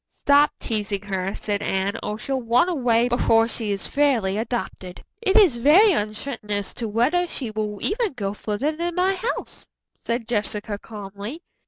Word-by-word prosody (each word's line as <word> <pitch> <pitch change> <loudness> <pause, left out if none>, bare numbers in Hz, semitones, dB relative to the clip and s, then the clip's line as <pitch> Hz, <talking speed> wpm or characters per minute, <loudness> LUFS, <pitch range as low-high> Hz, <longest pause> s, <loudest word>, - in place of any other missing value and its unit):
"Stop 285 +1 +6
teasing 205 -3 -2
her," 195 -1 -3
said 205 -1 -2
Anne, 195 +1 0
"or 210 0 -3
she'll 265 +4 -2
run 240 +7 +3
away 245 -8 +2
before 225 -2 +3
she 225 -2 -3
is 200 -1 -3
fairly 250 -10 +1
adopted." 215 -5 -4 0.2
"It 390 -4 +1
is 365 - +6
very 325 - +6
uncertain 215 - -3
as 205 -1 -2
to 235 - -4
whether 255 +12 +1
she 255 -8 -5
will 210 -1 -3
ever 445 +2 0
go 205 - -4
further 215 +8 -2
than 340 +1 -3
my 370 +2 +2
house," 445 +6 -4 0.4
said 235 -1 -2
Jessica 210 -2 -2
calmly. 205 - -8
230 Hz, 165 wpm, -23 LUFS, 205-290 Hz, 0.4 s, Stop